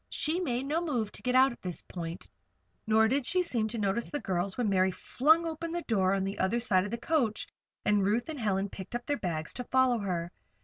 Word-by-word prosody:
She 320 +4 0
made 255 -8 -1
no 310 +4 0
move 240 -10 -1
to - - -11
get 250 0 0
out 265 +1 +6
at 235 - -12
this 180 -2 -5
point, 170 -1 -7 0.6
nor 220 0 +5
did 270 +4 +1
she 360 +8 +1
seem 235 -10 0
to 225 +2 -5
notice 210 +2 0
the 290 - -3
girls 185 -2 -2
when 245 -3 +1
Mary 190 -1 +3
flung 315 - +2
open 330 +1 -4
the 345 0 -3
door 195 -4 +2
on 195 - 0
the 195 +1 -4
other 210 +6 +1
side 190 -5 +2
of - - -4
the 235 - -3
coach, 240 -5 0 0.4
and 205 -1 +3
Ruth 215 +5 +1
and 310 -3 -5
Helen 200 -3 0
picked 195 +3 -8
up 240 - -4
their 290 - 0
bags 160 -4 -3
to 250 - -4
follow 255 -2 +3
her. 175 -4 -2
225 Hz, 235 wpm, -30 LUFS, 195-270 Hz, 0.6 s, out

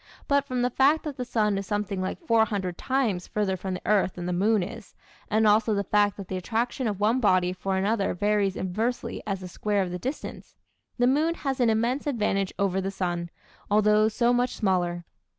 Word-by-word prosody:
But 280 -1 +2
from 255 -3 -1
the 250 - +1
fact 280 +6 +3
that 300 -3 -5
the 250 - -2
sun 210 -4 +1
is 195 - -6
something 205 -2 -2
like 185 - -3
400 210 - +1
times 230 -9 -1
further 205 -3 -1
from 185 0 -4
the - - -8
earth 200 -3 +2
than 175 - -5
the 180 - -1
moon 205 +2 +2
is, 180 - -9 0.3
and 220 +1 +2
also 215 +1 +4
the 200 - 0
fact 205 +1 +2
that 200 -3 -7
the 190 - -3
attraction 235 +6 -1
of 205 -3 -2
one 220 +5 +2
body 185 -5 +3
for 190 +1 -2
another 200 0 0
varies 205 0 +1
inversely 220 +7 -2
as 195 -2 -2
the 185 - -6
square 205 +2 -1
of 180 - -5
the 180 - -4
distance, 265 - -6 0.4
the 245 - +3
moon 305 +6 +2
has 270 -4 -3
an 240 -2 +4
immense 235 +6 0
advantage 210 -7 0
over 195 -1 +1
the 190 - -2
sun, 175 -3 -3 0.4
although 210 +1 +4
so 235 +2 +2
much 245 +1 +1
smaller. 175 -4 0
210 Hz, 205 wpm, -26 LUFS, 190-235 Hz, 0.4 s, also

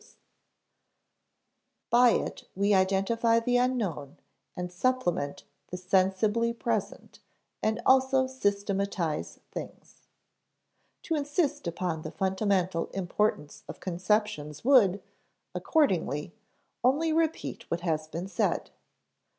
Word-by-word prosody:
[Sidenote: - - -22 1.8
By 240 +1 +7
it - - -2
we 200 +2 +2
identify 195 +5 +2
the 245 +2 +1
unknown] 210 - -1
[Sidenote: - - -34 0.4
and 180 0 -4
supplement 180 - -1 0.2
the 180 - -6
sensibly 195 +5 +1
present] 230 -3 -3 0.4
[Sidenote: 220 +1 +1
and - - -7
also 265 0 +4
systematize 200 -8 -2
things] - - -9 1.0
To 330 - -2
insist 290 - -1
upon 170 -1 -2
the 155 - -6
fundamental 190 -2 0
importance 190 -4 -2
of - - -9
conceptions 180 -4 -1
would, 205 -8 +5 0.5
accordingly, 175 - 0 0.5
only 300 +6 +3
repeat 325 0 -1
what 170 0 -2
has 155 -3 -1
been 170 +4 -5
said. 195 - -1
200 Hz, 105 wpm, -28 LUFS, 180-245 Hz, 1.8 s, By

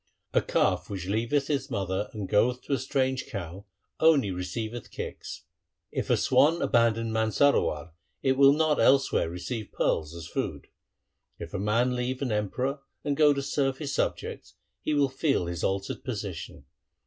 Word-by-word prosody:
A - - +4
calf - - +1
which 95 -3 -4
leaveth 115 +8 0
its 140 -2 -1
mother 100 -2 -2
and 105 -3 -5
goeth 125 +5 +2
to - - -3
a 135 - +1
strange 130 0 -1
cow, 95 0 -6 0.3
only 150 -10 +4
receiveth 110 +6 -4
kicks. - - -7 0.5
If - - -3
a - - +4
swan 165 +4 +4
abandon 115 -3 +2
Mansarowar, 110 - +2 0.3
it 135 - +3
will 135 +1 +6
not 155 0 +2
elsewhere 135 -10 +3
receive 105 +6 -5
pearls 80 +1 0
as 85 -1 -7
food. - - -4 0.7
If - - -8
a - - -2
man 115 +5 +2
leave 125 +2 -2
an 125 - -1
emperor 125 +7 -1 0.2
and 145 -1 0
go 150 0 +6
to 140 -1 -1
serve 135 -1 0
his 145 -2 -4
subjects, - - -3 0.3
he 155 - 0
will 145 -1 +4
feel 135 - 0
his 85 -1 -4
altered 95 0 -2
position. 100 -9 -6
120 Hz, 160 wpm, -28 LUFS, 100-140 Hz, 0.7 s, will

